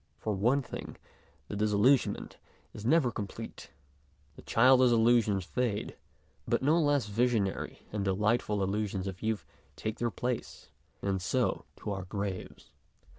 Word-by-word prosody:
For 110 - -2
one 120 +8 +2
thing, - - -7 0.5
the - - -5
disillusionment 105 +6 +2 0.4
is 105 - -8
never 145 -3 +4
complete. 105 +2 -7 0.7
The - - -12
childish 130 +2 +5
illusions 115 -4 +3
fade, 120 -2 -2 0.5
the - - +3
no 160 +5 +4
less 145 -4 +2
visionary 110 -2 0
and 105 -2 -1
delightful 105 +1 +1
illusions 100 -1 -1
of 95 -2 -6
youth 110 -1 -1 0.3
take 110 +6 -4
their 120 - +1
place, 120 +3 -4 0.3
and 95 -1 0
so 125 +7 0
to - - -5
our 95 -2 -4
graves. 100 0 -5
110 Hz, 130 wpm, -30 LUFS, 100-125 Hz, 0.7 s, childish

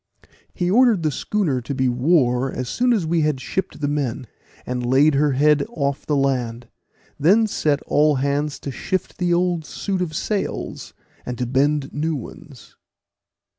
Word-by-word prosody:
He 175 0 -1
ordered 230 -5 +4
the 155 - +1
schooner 155 -5 -1
to 140 +4 -5
be 130 -1 +1
wore 125 -1 +2
as 125 - -4
soon 245 - +1
as 210 -8 +1
we 165 +1 +1
had 150 -3 0
shipped 190 +6 -4
the 145 - 0
men, 140 -3 -2 0.4
and 125 0 -3
laid 135 +5 +4
her 145 0 +2
head 150 +2 +3
off 140 - -3
the 150 - +1
land, 125 -4 -1 0.5
then 195 +10 +4
set 150 -8 0
all 150 0 +3
hands 140 +2 -1
to 140 - -5
shift 185 +9 -3
the 175 -1 +1
old 175 -1 +1
suit 190 +5 -3
of 160 -4 -3
sails, 205 +5 -3 0.3
and 125 - -5
to 125 - -1
bend 135 +3 0
new 155 +2 -1
ones. 130 - -11
150 Hz, 170 wpm, -21 LUFS, 130-175 Hz, 0.5 s, ordered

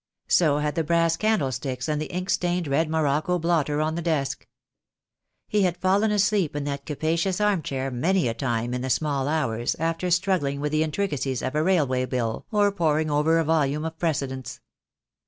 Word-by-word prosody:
So 155 -5 +4
had 150 0 -1
the 165 - 0
brass 165 +1 +2
candlesticks, 135 - -1
and 150 -1 -1
the 155 - -5
ink 180 +2 -2
stained 175 -2 0
red 155 +3 +1
morocco 155 +2 +1
blotter 155 -3 +1
on 155 +1 0
the 170 - -3
desk. 145 -5 -2 1.0
He 210 - +1
had 180 -2 +1
fallen 195 +3 +2
asleep 205 -6 +1
in 145 - -2
that 140 -1 -4
capacious 165 +5 -1
arm 210 -4 +2
chair 135 -2 -3
many 170 +7 +1
a 115 - -1
time 120 -1 -2
in 125 - -2
the 130 - -3
small 140 -1 0
hours, 120 -7 0
after 165 +2 -1
struggling 175 -6 +1
with 150 +1 -2
the 155 0 +1
intricacies 150 -6 -1
of 130 - -2
a 150 - +1
railway 145 -8 +2
bill 120 -4 -2
or 205 -2 +3
poring 155 -4 +1
over 150 +3 +3
a 165 - +2
volume 150 -1 +1
of 160 0 -6
precedents. 135 -6 -2
155 Hz, 185 wpm, -25 LUFS, 140-175 Hz, 1.0 s, So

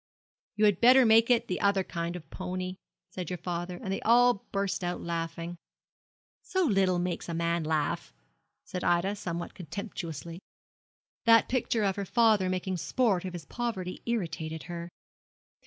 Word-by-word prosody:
"You 210 +1 +3
had 205 -4 +3
better 255 +2 +7
make 225 +1 +6
it 235 -1 +3
the 180 - -2
other 200 -1 +3
kind 170 -1 -4
of 175 - -8
pony," 185 0 -4 0.3
says 180 -3 -5
your 180 - -3
father, 175 +1 -4
and - - -11
then 190 - -3
they 195 - -2
all 240 -2 +4
burst 195 -2 -1
out 175 0 -2
laughing.' 165 0 -4 0.8
'So 375 -1 0
little 195 - +3
makes 175 -1 -2
a 170 - -2
man 170 0 0
laugh!' 155 - -1 0.5
said 180 - -5
Ida, 175 +4 +2
somewhat 170 -4 -5
contemptuously. 170 -3 -6 0.9
That 230 -1 +6
picture 240 -3 0
of 195 -1 +1
her 200 - -2
father 215 -3 +3
making 185 0 -2
sport 195 0 +1
of 185 - -5
his 170 -3 -7
poverty 205 -6 -4
irritated 165 -8 -3
her. 170 0 -6
185 Hz, 160 wpm, -29 LUFS, 170-210 Hz, 0.9 s, better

